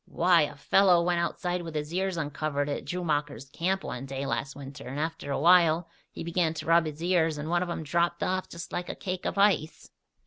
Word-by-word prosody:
Why! 175 Hz, -1 st, +4 dB
A 145 Hz, -1 st, -1 dB
fellow 175 Hz, +4 st, +4 dB
went 175 Hz, 0 st, +1 dB
outside 175 Hz, +1 st, -2 dB
with 165 Hz, -2 st, -8 dB
his 150 Hz, +2 st, -3 dB
ears 190 Hz, 0 st, -1 dB
uncovered 145 Hz, -1 st, -2 dB
at 145 Hz, -, -3 dB
Droomacher's 150 Hz, -6 st, -2 dB
camp 190 Hz, +5 st, -1 dB
one 125 Hz, +2 st, -5 dB
day 135 Hz, +1 st, -4 dB
last 135 Hz, 0 st, -3 dB
winter 140 Hz, 0 st, -9 dB
and 135 Hz, +3 st, -5 dB
after 160 Hz, -2 st, -3 dB
awhile 165 Hz, +2 st, +4 dB, 0.2 s
he -, -, -8 dB
began 165 Hz, -1 st, 0 dB
to -, -, -6 dB
rub 165 Hz, 0 st, +4 dB
his 155 Hz, +2 st, -6 dB
ears 165 Hz, -3 st, +2 dB
and 150 Hz, +2 st, -4 dB
one 175 Hz, 0 st, +2 dB
of 180 Hz, -, -2 dB
'em 170 Hz, -, -3 dB
dropped 170 Hz, +3 st, 0 dB
off 185 Hz, 0 st, -1 dB
just 170 Hz, 0 st, -8 dB
like 175 Hz, 0 st, -4 dB
a -, -, -4 dB
cake 185 Hz, -2 st, -4 dB
of -, -, -3 dB
ice." 195 Hz, -6 st, +1 dB
165 Hz, 215 wpm, -28 LUFS, 150-175 Hz, 0.2 s, Why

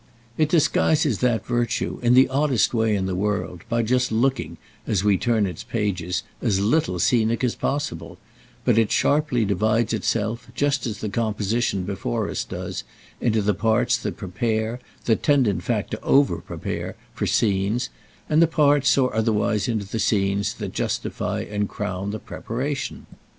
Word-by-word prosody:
It 155 Hz, +1 st, +2 dB
disguises 150 Hz, -, +2 dB
that 120 Hz, -4 st, +1 dB
virtue, 120 Hz, -1 st, -1 dB
in 120 Hz, 0 st, +4 dB
the 130 Hz, +1 st, +7 dB
oddest 135 Hz, -6 st, +2 dB
way 110 Hz, -2 st, +2 dB
in 95 Hz, -2 st, -1 dB
the 95 Hz, -, -2 dB
world, 90 Hz, -3 st, -2 dB
by 115 Hz, 0 st, +1 dB
just 125 Hz, +2 st, +1 dB
looking, 120 Hz, +2 st, 0 dB, 0.3 s
as 100 Hz, -4 st, +1 dB
we 105 Hz, -1 st, +4 dB
turn 110 Hz, +1 st, +1 dB
its 90 Hz, -4 st, -5 dB
pages, 90 Hz, -5 st, -2 dB, 0.2 s
as 105 Hz, -5 st, +1 dB
little 105 Hz, -, +1 dB
scenic 115 Hz, +4 st, +2 dB
as 125 Hz, -, +2 dB
possible; 140 Hz, -, -3 dB, 0.5 s
but 115 Hz, -, +4 dB
it 110 Hz, -2 st, +2 dB
sharply 145 Hz, -6 st, +2 dB
divides 110 Hz, +4 st, +1 dB
itself, 115 Hz, +2 st, -1 dB
just 140 Hz, -2 st, +1 dB
as 105 Hz, -3 st, -5 dB
the 110 Hz, -, -2 dB
composition 105 Hz, -1 st, 0 dB
before 90 Hz, -10 st, -2 dB
us -, -, -2 dB
does, -, -, -5 dB, 0.4 s
into 110 Hz, -3 st, +1 dB
the 105 Hz, +1 st, +2 dB
parts 110 Hz, 0 st, +2 dB
that -, -, -5 dB
prepare, 110 Hz, +4 st, -2 dB, 0.3 s
that 115 Hz, -, +2 dB
tend 140 Hz, -5 st, +3 dB
in 95 Hz, -4 st, 0 dB
fact 105 Hz, +2 st, -2 dB
to 110 Hz, -, -4 dB
over 140 Hz, 0 st, +3 dB
prepare, -, -, -5 dB, 0.2 s
for -, -, -2 dB
scenes, 105 Hz, +3 st, +1 dB, 0.4 s
and 155 Hz, +1 st, +3 dB
the 170 Hz, -, +6 dB
parts, 145 Hz, -3 st, +3 dB
or 130 Hz, -2 st, +2 dB
otherwise 110 Hz, -2 st, +1 dB
into 110 Hz, -4 st, -1 dB
the 110 Hz, +3 st, -3 dB
scenes, 100 Hz, -1 st, +1 dB
that -, -, -6 dB
justify -, -, -2 dB
and 105 Hz, -1 st, -2 dB
crown 100 Hz, -1 st, -4 dB
the 105 Hz, -, -3 dB
preparation. 135 Hz, +6 st, -4 dB
110 Hz, 165 wpm, -23 LUFS, 100-125 Hz, 0.5 s, the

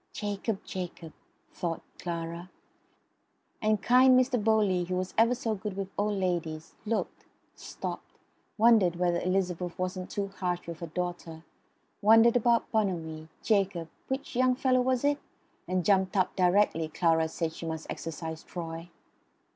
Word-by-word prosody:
"Jacob! 205 Hz, 0 st, -3 dB
Jacob!" 175 Hz, -3 st, -6 dB, 0.4 s
thought 170 Hz, -2 st, -3 dB, 0.2 s
Clara; 170 Hz, 0 st, -5 dB, 1.1 s
and 215 Hz, -2 st, +1 dB
kind 255 Hz, +1 st, +6 dB
Mr. 250 Hz, -3 st, +1 dB
Bowley, 205 Hz, -5 st, +3 dB
who 180 Hz, +1 st, -2 dB
was 185 Hz, 0 st, -3 dB
ever 230 Hz, +3 st, +4 dB
so 235 Hz, -3 st, -2 dB
good 200 Hz, -1 st, -5 dB
with 195 Hz, -1 st, -3 dB
old 205 Hz, 0 st, 0 dB
ladies, 165 Hz, -4 st, -2 dB
looked; 225 Hz, +1 st, -2 dB, 0.3 s
stopped; -, -, -7 dB, 0.4 s
wondered 215 Hz, -6 st, +5 dB
whether 175 Hz, -1 st, +1 dB
Elizabeth 180 Hz, -2 st, -1 dB
wasn't 185 Hz, 0 st, -3 dB
too 200 Hz, -1 st, -3 dB
harsh 180 Hz, -1 st, -1 dB
with 170 Hz, -1 st, -7 dB
her 170 Hz, -, -5 dB
daughter; 175 Hz, -1 st, -5 dB, 0.6 s
wondered 225 Hz, +3 st, +6 dB
about 235 Hz, -1 st, +2 dB
Bonamy, 165 Hz, -7 st, -1 dB, 0.2 s
Jacob 195 Hz, -6 st, +1 dB, 0.2 s
which 265 Hz, -1 st, -4 dB
young 255 Hz, 0 st, +3 dB
fellow 255 Hz, -1 st, +2 dB
was 255 Hz, 0 st, +1 dB
it? 290 Hz, 0 st, +2 dB, 0.5 s
and 185 Hz, -1 st, 0 dB
jumped 190 Hz, 0 st, +3 dB
up 185 Hz, -1 st, +1 dB
directly 180 Hz, -3 st, +3 dB
Clara 160 Hz, 0 st, +2 dB
said 160 Hz, 0 st, -3 dB
she 165 Hz, -, -7 dB
must 160 Hz, -1 st, -4 dB
exercise 160 Hz, 0 st, -5 dB
Troy. 165 Hz, -1 st, -7 dB
185 Hz, 140 wpm, -29 LUFS, 170-220 Hz, 1.1 s, kind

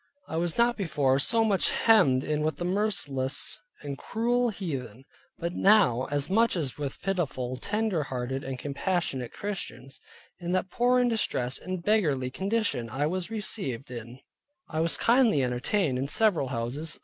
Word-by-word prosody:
I -, -, -5 dB
was 170 Hz, 0 st, -1 dB
not 235 Hz, 0 st, +3 dB
before 145 Hz, -8 st, +1 dB
so 225 Hz, +9 st, +2 dB
much 205 Hz, -4 st, +3 dB
hemmed 160 Hz, -, +4 dB
in 150 Hz, 0 st, -1 dB
with 155 Hz, +1 st, 0 dB
the 175 Hz, -, -4 dB
merciless 180 Hz, -9 st, 0 dB, 0.2 s
and 140 Hz, -1 st, -5 dB
cruel 240 Hz, +2 st, 0 dB
heathen, 135 Hz, -, -5 dB, 0.3 s
but 170 Hz, 0 st, -3 dB
now 185 Hz, -, +4 dB
as 145 Hz, -1 st, 0 dB
much 225 Hz, +4 st, +3 dB
with 145 Hz, -3 st, -3 dB
pitiful, 145 Hz, -10 st, -1 dB
tender 210 Hz, -, -1 dB
hearted 130 Hz, +1 st, -3 dB
and 135 Hz, -1 st, -4 dB
compassionate 140 Hz, -2 st, -2 dB
Christians. 180 Hz, -9 st, -6 dB, 0.4 s
In 175 Hz, 0 st, -3 dB
that 185 Hz, 0 st, -1 dB
poor, 245 Hz, +4 st, +3 dB
and 245 Hz, -, +3 dB
distressed, 135 Hz, -, 0 dB
and 185 Hz, -1 st, -5 dB
beggarly 150 Hz, -12 st, +1 dB
condition 195 Hz, -, -1 dB
I 140 Hz, +4 st, -1 dB
was 180 Hz, +4 st, -2 dB
received 190 Hz, -, -3 dB
in; 120 Hz, 0 st, -8 dB, 0.5 s
I 155 Hz, -, -3 dB
was 165 Hz, +1 st, +1 dB
kindly 230 Hz, -, +4 dB
entertained 125 Hz, +4 st, 0 dB
in 135 Hz, -, -1 dB
several 180 Hz, -4 st, +2 dB
houses. 130 Hz, +5 st, -3 dB
165 Hz, 155 wpm, -28 LUFS, 135-205 Hz, 0.5 s, hemmed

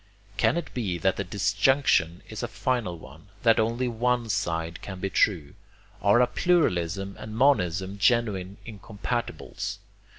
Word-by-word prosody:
Can 130 Hz, -, +2 dB
it 170 Hz, -, -5 dB
be 100 Hz, -8 st, -2 dB
that 95 Hz, +3 st, +1 dB
the 100 Hz, -, -1 dB
disjunction 100 Hz, -, +2 dB
is 110 Hz, -, -6 dB
a 120 Hz, -, -2 dB
final 115 Hz, -6 st, -2 dB
one? -, -, -14 dB, 0.2 s
that 115 Hz, -2 st, +5 dB
only 115 Hz, +3 st, 0 dB
one 120 Hz, 0 st, 0 dB
side 85 Hz, -5 st, -2 dB
can 95 Hz, -2 st, -7 dB
be 95 Hz, +1 st, -3 dB
true? 80 Hz, -8 st, +1 dB, 0.5 s
Are 100 Hz, +4 st, +4 dB
a -, -, +6 dB
pluralism 100 Hz, -, 0 dB
and 110 Hz, 0 st, -7 dB
monism 95 Hz, -7 st, +2 dB
genuine 100 Hz, -4 st, +1 dB
incompatibles? 110 Hz, +2 st, -5 dB
105 Hz, 140 wpm, -26 LUFS, 90-120 Hz, 0.5 s, a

